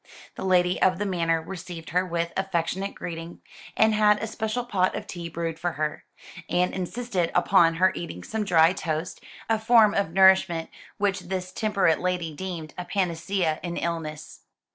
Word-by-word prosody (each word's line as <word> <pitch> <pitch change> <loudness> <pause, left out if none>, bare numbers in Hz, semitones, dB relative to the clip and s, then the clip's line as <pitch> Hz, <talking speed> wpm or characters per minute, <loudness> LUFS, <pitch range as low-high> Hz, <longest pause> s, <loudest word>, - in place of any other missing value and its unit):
The - - -7
lady 180 -1 +2
of 185 -1 +4
the 205 - -2
manor 165 -4 0
received 175 -2 -8
her 180 +2 +2
with 170 -1 -2
affectionate 190 +1 -2
greeting, 165 0 -7 0.4
and 220 0 +4
had 210 -1 +4
a 220 - -3
special 220 +2 -3
pot 190 -6 +1
of - - -5
tea 170 -2 -6
brewed 165 -1 -4
for 175 -1 -2
her, 150 +1 -3 0.4
and 180 +1 +1
insisted 190 -1 -2
upon 170 -4 +4
her 185 +3 +4
eating 90 - -6
some 220 -1 -3
dry 170 -3 +4
toast, 160 -1 -4 0.2
a 225 -1 +1
form 220 -2 +5
of 200 -5 0
nourishment 190 -3 +4 0.3
which 200 -2 0
this 185 0 -5
temperate 200 -7 +1
lady 180 -3 -2
deemed 170 -3 -6
a 180 - -4
panacea 180 -2 -1
in 175 -1 -4
illness. 160 -2 -4
180 Hz, 165 wpm, -25 LUFS, 165-195 Hz, 0.4 s, form